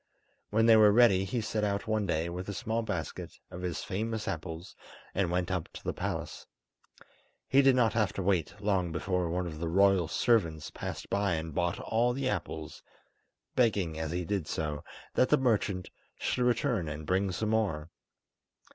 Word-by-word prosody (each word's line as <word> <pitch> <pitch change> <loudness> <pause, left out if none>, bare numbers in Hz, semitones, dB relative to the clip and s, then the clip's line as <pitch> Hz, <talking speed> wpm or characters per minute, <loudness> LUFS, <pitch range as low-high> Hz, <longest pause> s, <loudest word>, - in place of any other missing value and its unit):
When 110 +2 +3
they 115 -1 +8
were 105 -1 +7
ready, 100 -4 +5
he 115 +5 -2
set 110 0 -2
out 100 -1 0
one 110 -2 0
day 80 0 0
with 90 +3 -5
a 100 - -4
small 110 +3 -1
basket 85 -9 -5
of 90 - -7
his 90 -3 -3
famous 110 +3 -3
apples, 80 +3 -5 0.4
and 95 -2 +1
went 90 +1 0
up 90 -4 -2
to - - -10
the - - -2
palace. - - -4 1.0
He 135 - +5
did 135 -1 +5
not 115 -4 +3
have 105 -4 +2
to 95 - -3
wait 95 0 0
long 95 -4 0
before 90 +1 -1
one 90 +2 -1
of 80 -3 -6
the 85 - -2
royal 95 0 +4
servants 85 -6 +1
passed - - -6
by 100 -3 +1
and 80 0 -4
bought 85 +2 0
all 120 +2 +1
the 135 +1 -2
apples, 80 -10 -4 0.7
begging 100 -10 +1
as 80 -1 -2
he 90 +2 -2
did 95 -4 -2
so 75 -2 -3 0.3
that 130 - +3
the 150 - +5
merchant 105 -8 0 0.3
should 125 - 0
return 120 - +1
and 75 0 -6
bring 95 +3 +1
some 105 +4 -2
more. 95 -8 0
95 Hz, 180 wpm, -30 LUFS, 85-110 Hz, 1.0 s, they